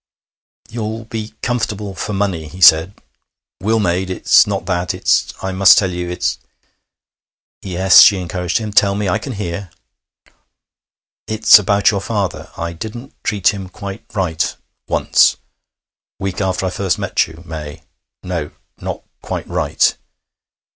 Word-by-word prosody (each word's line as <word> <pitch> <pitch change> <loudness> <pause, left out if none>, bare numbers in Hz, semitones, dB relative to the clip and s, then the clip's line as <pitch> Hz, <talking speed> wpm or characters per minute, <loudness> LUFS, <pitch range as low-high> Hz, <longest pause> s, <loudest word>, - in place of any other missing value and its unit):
'You'll 110 0 -5
be 110 -1 -6
comfortable 105 -4 -2
for 105 - -5
money,' 95 -6 -2
he 85 +5 -12
said. 80 +2 +5 0.6
'Will 110 +4 +1
made.... 95 -1 0
It's 95 - +4
not - - -3
that. 90 -2 -1
It's... - - +1
I 95 - -2
must 95 +1 +6
tell 95 -3 +2
you. 90 0 -4
It's 90 - -2 0.6
' - - -80
'Yes?' 95 0 +5
she 100 -4 +7
encouraged 90 -1 -2
him. 110 -2 -4
'Tell 100 -1 +4
me. 105 0 -2
I 90 - +1
can 135 - -6
hear.' 95 -2 -5 1.6
'It's 110 0 +6
about 100 0 +2
your 100 -2 -2
father. 100 -1 -3
I 85 0 -4
didn't 110 +9 -8
treat 100 -3 +2
him 95 -2 -7
quite 100 +2 -8
right... 80 -6 -1 0.3
once.... - - +3 0.8
Week 95 0 -4
after 95 -1 -1
I 95 - -1
first 95 -2 -1
met - - 0
you, 80 +2 -13
May.... 80 -1 -8 0.4
No, 85 -5 -4 0.3
not - - -6 0.2
quite - - -5
right. - - +1
95 Hz, 145 wpm, -17 LUFS, 90-105 Hz, 1.6 s, she